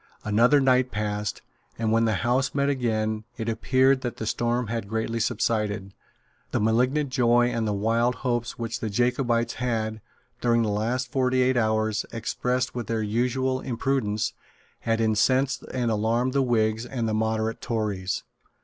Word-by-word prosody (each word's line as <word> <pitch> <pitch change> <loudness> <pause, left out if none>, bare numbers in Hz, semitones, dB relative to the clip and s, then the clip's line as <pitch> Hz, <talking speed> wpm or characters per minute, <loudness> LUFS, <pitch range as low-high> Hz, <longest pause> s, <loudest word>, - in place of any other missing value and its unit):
Another 120 +7 +4
night 130 -1 +3
passed; 105 -2 -3 0.3
and, 115 -1 0
when 115 +1 +3
the 110 -2 +1
House 130 +3 +1
met 140 0 +2
again, 110 -5 -1
it 115 -1 -4
appeared 130 +4 +2
that 120 -3 -4
the 110 - -4
storm 120 +2 0
had 115 -2 -4
greatly 110 +1 -2
subsided. 105 -3 -1 0.6
The - - -1
malignant 125 +6 +1
joy 120 -1 +3
and 115 -2 -1
the 105 - 0
wild 115 +4 +1
hopes 120 -1 -1
which 115 0 -3
the 110 - -3
Jacobites 120 +1 +1
had, 110 -3 -1 0.4
during 120 -1 +3
the 110 - 0
last 120 +5 -1
forty 130 -1 +2
eight 130 +1 +2
hours, 110 -2 +1
expressed 125 +2 -1
with 120 -4 -4
their 115 -1 -1
usual 125 +4 0
imprudence, 120 -3 -1 0.5
had 115 0 0
incensed 130 +5 +2
and 120 -3 0
alarmed 115 +4 +1
the 140 - +3
Whigs 110 -3 +1
and 120 -2 -3
the 110 - -1
moderate 110 +1 -1
Tories. 105 -6 -2
115 Hz, 160 wpm, -25 LUFS, 110-125 Hz, 0.6 s, Another